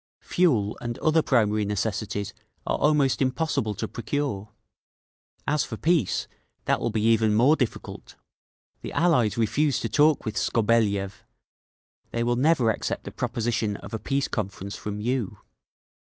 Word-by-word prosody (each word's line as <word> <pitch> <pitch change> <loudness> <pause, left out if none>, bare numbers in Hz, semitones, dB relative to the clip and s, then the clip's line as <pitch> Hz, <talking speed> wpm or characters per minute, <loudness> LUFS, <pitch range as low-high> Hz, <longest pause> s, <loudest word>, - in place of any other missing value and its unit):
Fuel 120 - +1
and 120 0 -4
other 160 +1 +3
primary 110 -6 +2
necessities 105 0 -2 0.3
are - - -1
almost 145 -3 +2
impossible 130 -5 0
to - - -3
procure…. 115 -4 -3 1.0
"As 150 -1 +1
for 115 - -6
peace, 160 - +1 0.4
that - - +2
will 120 - -1
be 110 -1 -1
even 110 -1 +3
more 130 +8 +5
difficult. 125 -7 -4 0.7
The - - -7
allies 125 - +2
refused 140 +5 +1
to 115 - -1
talk 150 +6 +3
with 110 -1 -3
Skobeliev. 105 -4 +1 0.9
They 115 - -1
will 120 +1 +1
never 130 -3 +3
accept - - -3
the - - -7
proposition 115 -3 -1
of - - -11
a 110 - -2
peace 135 +3 -1
conference 100 -2 -4
from 105 -1 -5
_you. 120 0 -2
115 Hz, 140 wpm, -25 LUFS, 105-140 Hz, 1.0 s, more